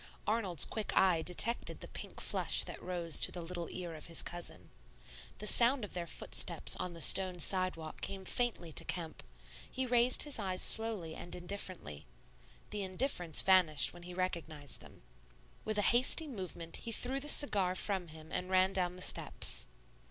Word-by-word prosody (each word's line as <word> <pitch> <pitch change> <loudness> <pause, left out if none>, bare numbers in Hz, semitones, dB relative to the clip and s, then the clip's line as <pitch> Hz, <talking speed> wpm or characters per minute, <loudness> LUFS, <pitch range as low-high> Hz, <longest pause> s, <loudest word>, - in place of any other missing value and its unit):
Arnold's 200 -8 +4
quick 220 -2 -4
eye 180 -4 +3
detected 200 +8 0
the - - -9
pink - - -10
flush - - +1
that - - -9
rose 175 -3 +2
to - - +3
the 180 - -7
little 175 0 -6
ear 175 -2 -6
of 155 - -9
his 165 -1 0
cousin. 175 0 -7 0.7
The 210 - -7
sound 240 +2 +4
of - - -13
their 175 -1 -5
footsteps - - +2
on 180 -1 -5
the 165 - -8
stone 185 +2 +4
sidewalk 180 -3 -1
came 195 -1 -6
faintly 225 -7 -2
to - - +4
Kemp; 165 -3 -5 0.5
he 260 0 -3
raised 245 0 +5
his 295 -5 -2
eyes 185 -3 -2
slowly 220 -8 +2
and 175 - -9
indifferently. 175 - -7 0.6
The 210 - -3
indifference 185 - 0
vanished 180 -6 +4
when 175 - -13
he 175 +1 -10
recognized 165 -6 -4
them. - - -16 0.6
With 215 -1 -3
a 205 - +1
hasty 255 +6 +4
movement 185 - -6
he 230 - -7
threw 255 +4 -1
the 295 +2 -3
cigar 195 -12 +2
from 190 -2 -2
him 160 0 -13
and 180 0 -3
ran 190 +1 +2
down 180 -1 -2
the 185 - -7
steps. - - +1
185 Hz, 175 wpm, -33 LUFS, 170-210 Hz, 0.7 s, raised